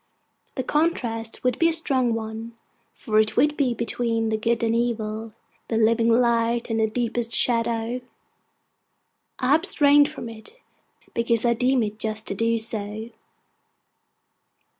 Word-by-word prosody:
The 260 - -2
contrast 240 -7 -1
would 250 -2 0
be 330 - +4
a - - +2
strong 260 -7 +2
one, 225 +1 -6 0.4
for 215 -3 0
it 215 0 +1
would 295 0 +3
be 260 -5 0
between 230 -1 -1
the 220 - 0
Good 230 +1 0
and 225 0 +1
Evil, 225 -2 -2 0.4
the 225 - -1
living 230 +1 +3
light 235 0 +1
and 220 -1 0
deepest 235 0 -2
shadow. 230 0 +1 1.4
I 260 +1 +2
abstain 290 -4 +4
from 300 -6 -8
it, 230 - -10 0.6
because 230 0 +1
I 235 - +4
deem 250 +1 +1
it 210 0 -5
just 215 0 -4
to - - -1
do 230 +3 0
so. 220 0 -1
230 Hz, 140 wpm, -24 LUFS, 225-250 Hz, 1.4 s, be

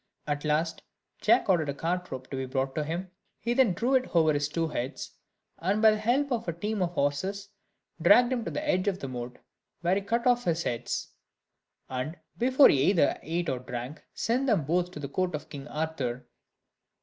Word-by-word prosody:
At 145 -1 -2
last 155 +2 0 0.4
Jack - - +4
ordered 170 -6 +2
a 140 - -2
cart 180 +4 -2
rope 130 -1 -6
to - - -3
be 130 0 -3
brought 135 +1 -1
to 155 - -1
him; 175 +4 -4 0.3
he 235 - -1
then 245 -6 +4
drew 240 +9 0
it 260 -7 +1
over 160 -2 +5
his 145 0 0
two 165 +2 -1
heads, 130 -3 -4 0.5
and 195 +5 +1
by 220 0 +7
the 215 - -1
help 260 +6 +1
of 230 -4 -1
a 170 - -1
team 205 +4 -3
of 175 -1 0
horses, 190 +8 -1 0.5
dragged 245 +9 +6
him 240 -2 -1
to - - -2
the 300 - -4
edge 185 -6 +1
of 195 -2 +1
the 140 - -6
moat, 125 -1 -6 0.4
where 175 +1 +2
he 200 - +1
cut 235 +5 -1
off 245 -1 +3
his 170 0 +1
heads: 120 -1 -3 0.8
and 130 +6 -4 0.2
before 260 +3 +6
he 135 - +3
either 165 0 +3
ate 170 +2 -2
or 130 -3 -1
drank, 125 +3 -6
sent 250 +4 0
them 205 - +2
both 175 +4 +1
to 180 - -9
the 140 - -4
court 180 +3 -1
of 150 - -7
King 140 -1 -8
Arthur. 145 -6 -3
170 Hz, 210 wpm, -28 LUFS, 145-210 Hz, 0.8 s, by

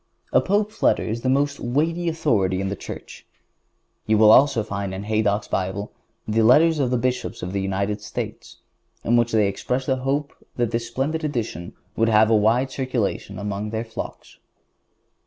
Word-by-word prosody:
A - - +5
Pope's 210 +2 -1
letter - - +3
is 115 +2 -3
the 130 - 0
most 140 +2 +1
weighty 165 +7 0
authority 110 - +1
in 95 0 -2
the 100 - -3
Church. - - -10 0.8
You 110 0 +3
will 110 0 +7
also 130 -2 +5
find 100 -2 -4
in 95 - -5
Haydock's 105 -1 0
Bible 95 +2 -3 0.4
the 110 +1 +2
letters 155 +8 +5
of 130 -3 +1
the 125 - +1
Bishops 125 -4 -2
of 90 +1 -4
the 100 - -1
United 100 +2 -2
States, - - -6 0.5
in 120 - +2
which 120 0 +2
they 110 -2 +3
express 125 +6 -2
the 130 0 +1
hope 140 +3 -2 0.2
that 120 -2 0
this 115 0 -2
splendid 145 +7 -2
edition 115 - -3 0.2
would 115 0 +2
have 110 0 +4
a - - +5
wide 115 +5 +2
circulation 125 -7 -2
among 105 +1 -4
their 110 +1 -3
flocks. 115 - -8
115 Hz, 175 wpm, -23 LUFS, 105-135 Hz, 0.8 s, will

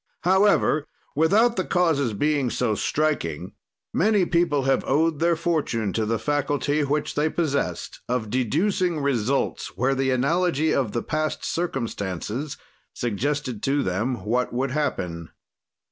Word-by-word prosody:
However, 190 -5 +3 0.3
without 205 - +3
the 185 - +1
causes 160 - +1
being 145 +2 +1
so 120 -2 0
striking, 100 - -1 0.4
many 205 -1 +3
people 170 -5 +1
have 135 0 +2
owed 155 +2 +2
their 170 +1 +3
fortune 155 - -1
to 110 -1 0
the 115 +1 +1
faculty 145 +2 0
which 145 +1 -1
they 150 +2 +1
possest 155 -4 -2
of 115 -4 -1
deducing 165 - +1
results 135 -2 -1
where 130 +3 +2
the 135 0 0
analogy 155 +4 +1
of 125 -7 0
the 120 - -1
past 155 0 -2
circumstances 120 - -3 0.4
suggested 125 +1 -2
to 140 +1 +1
them 105 +4 -2
what 125 +3 0
would 130 +2 -1
happen. 90 - -2
140 Hz, 130 wpm, -24 LUFS, 120-160 Hz, 0.4 s, However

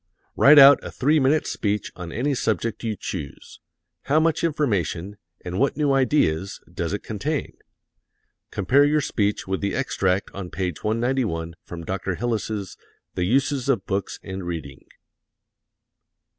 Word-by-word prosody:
Write 150 +2 +7
out 140 -1 +9
a - - -6
three 150 +4 +2
minute 145 +3 +2
speech 105 -1 -2
on 90 -2 -7
any 135 - 0
subject 115 -2 -1
you 110 -2 -1
choose. 80 -6 -7 0.5
How 145 +3 +3
much 160 0 +1
information, 100 - -1 0.3
and 90 +1 -3
what 140 +2 +1
new 145 -2 +2
ideas, 105 - +1
does 85 -1 -3
it 100 - -3
contain? 140 +8 -3 0.9
Compare 130 +9 +3
your 150 +1 +2
speech 105 -6 -1
with 95 0 -2
the 100 -1 -1
extract 95 -8 0
on 95 -2 -6
page 90 -2 -4
191 110 -7 -1
from 85 -1 -8
Dr. 95 0 -3
Hillis's 110 -3 -3 0.4
"The 90 - -1
Uses 135 +4 +1
of 115 -8 +1
Books 100 0 -3
and 95 -1 -6
Reading." 80 -6 -6
7. - - -30
105 Hz, 145 wpm, -23 LUFS, 95-135 Hz, 0.9 s, out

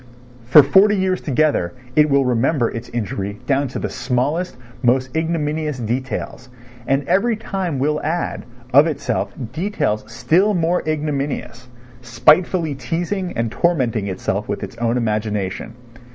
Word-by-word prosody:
For 145 +3 +9
forty 195 +9 +5
years 185 -1 0
together 140 - +1 0.2
it 150 0 +5
will 140 -1 +3
remember 125 +1 +1
its 115 +1 -7
injury 100 -3 -3
down 140 0 +1
to 130 - -6
the - - -2
smallest, 135 +7 -1 0.2
most 130 +1 +1
ignominious 155 -2 -1
details, 125 +1 -4 0.4
and 135 +1 +1
every 225 +4 +2
time 190 -7 -3
will 150 +3 0
add, 165 +3 -2 0.3
of 145 +4 +7
itself, 140 -6 -2 0.2
details 155 - -1
still 195 +5 +2
more 170 +1 +1
ignominious, 140 -5 -3 0.3
spitefully 155 +6 +3
teasing 175 +8 -3
and 115 -1 -1
tormenting 125 - 0
itself 95 -2 -2
with - - -3
its - - -7
own 120 +1 0
imagination. 105 -2 -2
140 Hz, 135 wpm, -20 LUFS, 120-165 Hz, 0.4 s, For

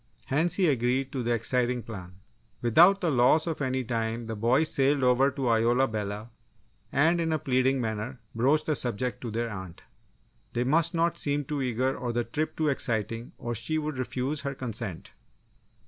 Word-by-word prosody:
Hence, 160 +7 +1
he 190 - +2
agreed 130 0 +1
to 130 - -3
the 120 0 -1
exciting 125 +1 0
plan. 90 -5 -9 0.5
Without 175 - +6
the 170 - +1
loss 130 +5 +4
of 160 -3 -3
any 130 -1 0
time, 115 0 -2
the 110 -1 -5
boys 125 +9 +2
sailed 140 0 +2
over 125 +2 +4
to 135 -2 -3
Isola 120 +3 +3
Bella 105 +1 -4 0.6
and 165 +5 +3
in 165 -1 0
a 155 - +2
pleading 130 -1 +1
manner 110 +2 -3
broached 140 +7 +2
the 155 - +1
subject 125 -2 -2
to 120 - -4
their 115 +1 -2
aunt. 95 -4 -8 0.7
They 120 - 0
must 165 +6 +2
not 170 0 +1
seem 145 0 -1
too 145 0 -3
eager 130 +1 0
or 120 -1 -3
the 120 0 0
trip 155 +7 -3
too 155 - +1
exciting 115 -4 -2
or 120 - -4
she 140 +8 -2
would 150 -3 -3
refuse 130 +3 -2
her 140 -1 -4
consent. 115 -8 -5
130 Hz, 180 wpm, -28 LUFS, 115-145 Hz, 0.7 s, Without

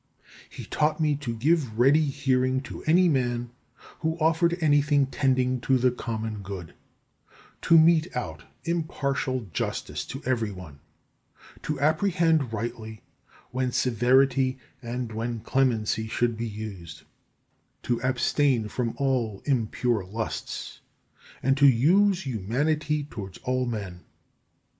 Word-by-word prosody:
He - - -9
taught 155 +1 0
me 150 -2 +2
to 125 -5 -4
give 135 -2 +1
ready 140 +6 +5
hearing 130 -2 +1
to - - -8
any 175 +4 +5
man 120 -5 0 0.5
who 160 0 -1
offered 165 +1 +2
anything 145 -2 +3
tending 130 -2 0
to 130 +1 +2
the 125 0 +3
common 110 -3 -4
good; 95 -4 -7 0.9
to 165 - +5
mete 160 0 +5
out 80 -10 -4 0.2
impartial 140 -7 -2
justice - - -3
to 135 - -8
every 115 -4 0
one; 90 -7 -11 0.8
to 150 - -3
apprehend 160 - +2
rightly 110 -1 -5 0.5
when 130 0 -1
severity 130 +2 +2 0.2
and 120 -1 -4
when 115 +1 -3
clemency 115 -3 0
should 120 +1 0
be 115 +1 -3
used; 95 -6 -8 0.8
to 120 -1 -1
abstain 130 -2 +1
from 120 -1 -2
all 125 -7 -1
impure 120 -4 0
lusts; 110 +4 -5 0.6
and 135 +1 +3
to 140 +1 +6
use 180 - +4
humanity 145 +7 -1
towards 100 -10 -8
all 130 0 0
men. 100 -6 -5
130 Hz, 120 wpm, -26 LUFS, 115-145 Hz, 0.9 s, to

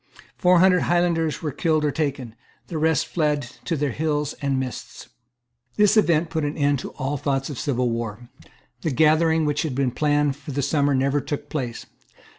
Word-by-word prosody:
Four 180 -1 +4
hundred 185 +1 +5
Highlanders 170 -3 +1
were 150 - -1
killed 155 +2 +1
or 145 - +1
taken. 135 -6 -3 0.4
The 160 - -3
rest 160 0 +2
fled 150 -3 0 0.2
to 170 - -1
their 145 -1 0
hills 150 +1 -1
and 140 -2 0
mists, 130 -3 -7 0.7
This 210 +1 +4
event 170 -6 +3
put 160 - -1
an 145 +2 -3
end 145 -2 +2
to - - -6
all 135 +2 -3
thoughts 135 +1 -1
of 135 - -6
civil 125 -4 0
war. 115 0 -5 0.5
The - - -1
gathering 160 +2 +3
which 150 0 0
had 155 -6 -3
been 135 -2 +1
planned 145 +1 +1
for 145 0 -8
the 140 +1 -1
summer 145 0 +2
never 140 +2 +1
took 145 - -5
place. 125 -6 -4
145 Hz, 185 wpm, -23 LUFS, 135-160 Hz, 0.7 s, hundred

